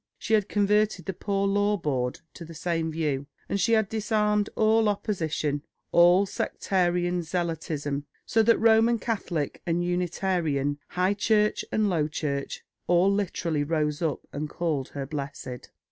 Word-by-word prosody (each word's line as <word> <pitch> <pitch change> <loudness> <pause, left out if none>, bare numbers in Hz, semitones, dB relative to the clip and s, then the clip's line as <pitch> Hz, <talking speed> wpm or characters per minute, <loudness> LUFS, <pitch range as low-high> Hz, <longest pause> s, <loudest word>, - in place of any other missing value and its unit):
She 225 - -3
had 210 -2 +3
converted 205 -3 +2
the 190 - -3
Poor 195 +2 -1
Law 205 +1 +2
Board 130 -7 -2
to - - -9
the 165 0 -10
same 165 -1 -1
view, 145 -4 -2 0.2
and 200 - -1
she 230 - +3
had 220 -2 +3
disarmed 210 -1 +1
all 220 0 +3
opposition, 160 -8 -1 0.3
all 175 +3 +6
sectarian 180 -2 0
zealotism; 155 -4 -3 0.2
so 225 - +3
that 230 +1 +4
Roman 225 +1 +4
Catholic 190 - -3
and 175 0 0
Unitarian, 175 -5 0
High 185 +2 +1
Church 210 +1 +2
and 215 -1 +2
Low 165 -6 +1
Church, 140 -2 -4 0.2
all 180 +3 +4
literally 170 -6 -1
rose 150 0 -1
up 160 -4 -1
and 150 +1 -3
called 155 -6 -2
her 140 -1 -5
blessed." 140 -3 -6
175 Hz, 145 wpm, -27 LUFS, 150-205 Hz, 0.3 s, all